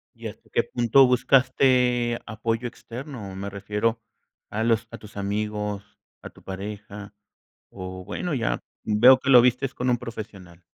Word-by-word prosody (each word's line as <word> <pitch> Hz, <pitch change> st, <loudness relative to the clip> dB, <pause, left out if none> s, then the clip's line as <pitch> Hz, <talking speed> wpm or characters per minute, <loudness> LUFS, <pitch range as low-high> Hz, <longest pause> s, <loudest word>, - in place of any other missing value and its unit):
¿Y -, -, -7 dB
hasta -, -, -12 dB
qué -, -, +1 dB
punto 125 Hz, +2 st, +4 dB
buscaste 125 Hz, -1 st, +3 dB
apoyo 115 Hz, +2 st, -2 dB
externo? 120 Hz, -4 st, -8 dB
Me 100 Hz, +1 st, -5 dB
refiero 105 Hz, +3 st, -2 dB, 0.5 s
a 110 Hz, +2 st, -2 dB
los 115 Hz, 0 st, +2 dB
a 115 Hz, -, -7 dB
tus 105 Hz, -1 st, -14 dB
amigos, 105 Hz, 0 st, -3 dB, 0.4 s
a -, -, -8 dB
tu -, -, -20 dB
pareja, 100 Hz, +1 st, -7 dB, 0.6 s
o 95 Hz, -1 st, -8 dB
bueno, 175 Hz, -, -4 dB
ya 120 Hz, -3 st, -1 dB, 0.2 s
veo 125 Hz, +5 st, +6 dB
que 135 Hz, -, -1 dB
lo 125 Hz, -, +9 dB
vistes 125 Hz, +2 st, +1 dB
con 125 Hz, +1 st, -1 dB
un 120 Hz, -, +2 dB
profesional. 100 Hz, -7 st, -9 dB
115 Hz, 150 wpm, -25 LUFS, 100-125 Hz, 0.6 s, lo